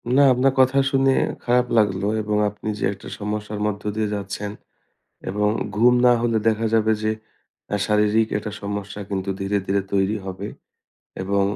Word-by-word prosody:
না, 140 Hz, -, +6 dB
আপনার 130 Hz, +2 st, +2 dB
কথা 130 Hz, +1 st, +4 dB
শুনে 135 Hz, 0 st, +3 dB, 0.3 s
খারাপ 125 Hz, +1 st, +2 dB
লাগলো 100 Hz, -2 st, +2 dB
এবং 105 Hz, 0 st, -1 dB
আপনি 105 Hz, +1 st, -7 dB
যে -, -, -4 dB
একটা 95 Hz, -, -12 dB
সমস্যার 105 Hz, 0 st, -4 dB
মধ্য 105 Hz, -1 st, -3 dB
দিয়ে 110 Hz, -1 st, 0 dB
যাচ্ছেন 100 Hz, +1 st, -4 dB, 0.8 s
এবং 105 Hz, +2 st, +1 dB, 0.3 s
ঘুম 120 Hz, +3 st, +6 dB
না 125 Hz, -, +7 dB
হলে 115 Hz, -1 st, +1 dB
দেখা 115 Hz, 0 st, +2 dB
যাবে 110 Hz, -1 st, +3 dB
যে, 110 Hz, -, +2 dB, 0.6 s
আ -, -, +3 dB
শারীরিক 105 Hz, +1 st, +3 dB
একটা 105 Hz, 0 st, -5 dB
সমস্যা 100 Hz, 0 st, -5 dB
কিন্তু 95 Hz, -1 st, -3 dB
ধীরে, 100 Hz, +1 st, 0 dB
ধীরে 100 Hz, 0 st, +1 dB
তৈরি 100 Hz, +2 st, +2 dB
হবে 95 Hz, +1 st, -5 dB, 0.8 s
এবং 100 Hz, +1 st, +1 dB
105 Hz, 160 wpm, -22 LUFS, 100-115 Hz, 0.8 s, না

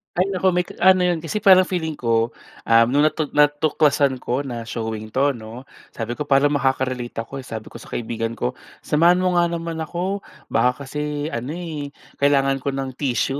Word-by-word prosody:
Ay 180 Hz, +2 st, +2 dB
naku 190 Hz, -1 st, 0 dB
may 180 Hz, 0 st, 0 dB
ka -, -, -11 dB
ano 185 Hz, -1 st, +6 dB
'yon 170 Hz, -2 st, -1 dB
kasi 190 Hz, +6 st, -2 dB
parang 185 Hz, -2 st, +7 dB
feeling 160 Hz, -4 st, -3 dB
ko, 115 Hz, -1 st, 0 dB, 0.3 s
um 115 Hz, 0 st, +6 dB
nung 145 Hz, +2 st, +4 dB
natu-natuklasan 145 Hz, -2 st, +2 dB
ko 130 Hz, +4 st, -2 dB
na 120 Hz, -4 st, -6 dB
showing 110 Hz, -1 st, -4 dB
to 135 Hz, +6 st, +2 dB
'no, 115 Hz, +1 st, -9 dB, 0.3 s
sabi 120 Hz, +3 st, -4 dB
ko 150 Hz, -, -3 dB
parang 140 Hz, +1 st, +4 dB
makaka-relate 130 Hz, -3 st, -1 dB
ako 135 Hz, +3 st, -8 dB
eh 130 Hz, -, -10 dB
sabi 110 Hz, -1 st, -7 dB
ko -, -, -10 dB
sa -, -, -13 dB
kaibigan 115 Hz, 0 st, -3 dB
ko 125 Hz, +1 st, -1 dB, 0.3 s
samahan 175 Hz, +4 st, +3 dB
mo 180 Hz, -1 st, +2 dB
nga 170 Hz, -, +3 dB
naman 165 Hz, -1 st, -4 dB
ako 180 Hz, +5 st, -3 dB, 0.3 s
baka 125 Hz, +3 st, +1 dB
kasi 150 Hz, +2 st, -4 dB
ano 125 Hz, +7 st, -4 dB
eh, 155 Hz, -5 st, -6 dB, 0.2 s
kailangan 135 Hz, -1 st, +3 dB
ko 135 Hz, +1 st, -3 dB
ng 135 Hz, -1 st, -3 dB
tissue 135 Hz, 0 st, 0 dB
140 Hz, 190 wpm, -22 LUFS, 125-165 Hz, 0.3 s, parang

